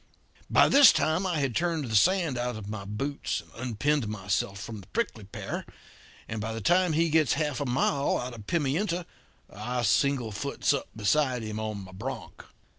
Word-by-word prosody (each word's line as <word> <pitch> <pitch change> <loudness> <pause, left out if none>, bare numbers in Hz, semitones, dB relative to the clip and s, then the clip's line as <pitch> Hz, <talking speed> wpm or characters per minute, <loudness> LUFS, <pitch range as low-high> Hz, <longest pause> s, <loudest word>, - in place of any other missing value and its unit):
By - - +6
this 280 -2 +8
time 160 +5 +1
I 175 -3 0
had 135 -5 -1
turned 165 -4 0
the 110 -2 -3
sand 170 - +3
out 120 0 -2
of 110 -2 -7
my 105 -2 -5
boots 135 +8 -3
and - - -22 0.2
unpinned 140 +2 0
myself 100 -1 -2
from 110 0 -7
the 95 - -17
prickly 165 - -3
pear; 100 - -5 0.6
and 110 -1 -4
by 110 +1 -3
the 115 - -4
time 175 - +3
he 165 +1 +2
gets 155 -4 +4
half 150 -2 -1
a 140 - -1
mile 140 +3 +1
out 125 0 -5
of 110 -3 -11
Pimienta, 170 +3 0 0.5
I 120 +4 -3
singlefoots 135 +2 +1
up 140 - -2
beside 125 +3 +1
him 110 0 -4
on 110 -2 -4
my 95 - -12
bronc. 115 +5 -7
125 Hz, 185 wpm, -28 LUFS, 110-155 Hz, 0.6 s, this